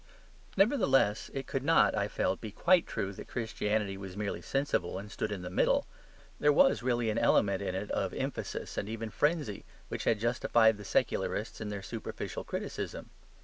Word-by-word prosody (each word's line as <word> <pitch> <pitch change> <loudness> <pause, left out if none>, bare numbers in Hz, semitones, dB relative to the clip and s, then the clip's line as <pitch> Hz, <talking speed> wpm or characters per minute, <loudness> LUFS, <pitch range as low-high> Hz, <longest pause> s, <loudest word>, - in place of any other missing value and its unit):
Nevertheless 135 - +3
it 135 -1 -4
could 135 - -2
not, 160 +5 +4
I - - 0
felt, - - -1
be 110 - -5
quite 175 - +3
true 100 0 -3
that - - -9
Christianity 105 -3 -1
was 95 -1 -8
merely 105 -1 -3
sensible 135 -11 -1
and 105 +2 -8
stood 110 - -3
in 95 -3 -4
the 90 - -5
middle. - - +2 0.5
There 150 - +5
was 270 - +5
really 120 -2 +1
an 110 - 0
element 100 -4 +3
in 95 -2 -2
it 100 +2 -4
of - - 0
emphasis - - -4
and 100 - -4
even 115 0 -4
frenzy 145 - 0 0.3
which - - -4
had 110 - +2
justified 115 -1 +3
the 105 - -9
secularists - - -1
in 105 - -3
their 100 -2 -5
superficial 115 +2 -5
criticism. - - -5
110 Hz, 180 wpm, -31 LUFS, 100-135 Hz, 0.5 s, There